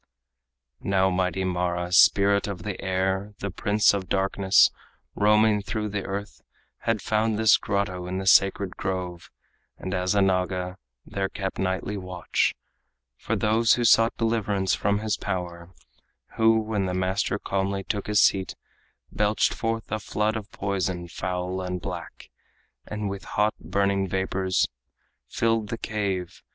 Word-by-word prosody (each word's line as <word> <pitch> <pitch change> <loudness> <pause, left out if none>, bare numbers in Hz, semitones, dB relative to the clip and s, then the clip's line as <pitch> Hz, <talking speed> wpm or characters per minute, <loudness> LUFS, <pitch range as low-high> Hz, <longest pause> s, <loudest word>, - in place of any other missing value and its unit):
Now 95 -1 +2
mighty 95 +1 0
Mara, 90 -1 -1
spirit 100 +2 +5
of 95 -4 -5
the 105 -3 -5
air, 95 +2 -1
The 100 - -4
prince 105 +4 +3
of 95 -2 -3
darkness, 95 0 +4 0.4
roaming 105 0 +3
through 105 +1 -3
the 100 -1 -3
earth 100 +1 -5 0.5
Had 115 -3 +1
found 110 0 +1
this 110 -1 +6
grotto 95 -3 -2
in 95 +1 -3
the 95 - -4
sacred 95 0 +4
grove, 90 -2 -4 0.5
And 95 - -5
as 90 +1 0
a 100 - +4
Naga 90 -1 0 0.3
there 95 -1 -3
kept 95 -1 -5
nightly 95 +2 -1
watch 90 -2 -1 0.6
For - - -3
those 110 +2 +3
who 120 - -1
sought 115 0 +5
deliverance 105 -4 0
from 100 +1 0
his 110 -1 -1
power, 90 -3 -4 0.6
Who, 110 0 +4
when 105 -3 -1
the 90 - -2
master 95 +2 0
calmly 95 -1 -2
took 100 +1 -3
his 105 -1 +4
seat, 95 -1 +2 0.6
Belched 105 0 +1
forth 115 -2 -3
a 110 - -1
flood 105 +1 -1
of 105 -2 -5
poison, 95 -3 -2
foul 90 +2 -3
and 90 0 -3
black, - - -8 0.6
And 105 -1 -4
with 100 0 -5
hot, 105 +1 +1
burning 100 -1 0
vapors 95 0 0 0.6
filled 115 -2 0
the 115 - -3
cave. 100 -6 -3
100 Hz, 145 wpm, -25 LUFS, 95-105 Hz, 0.6 s, this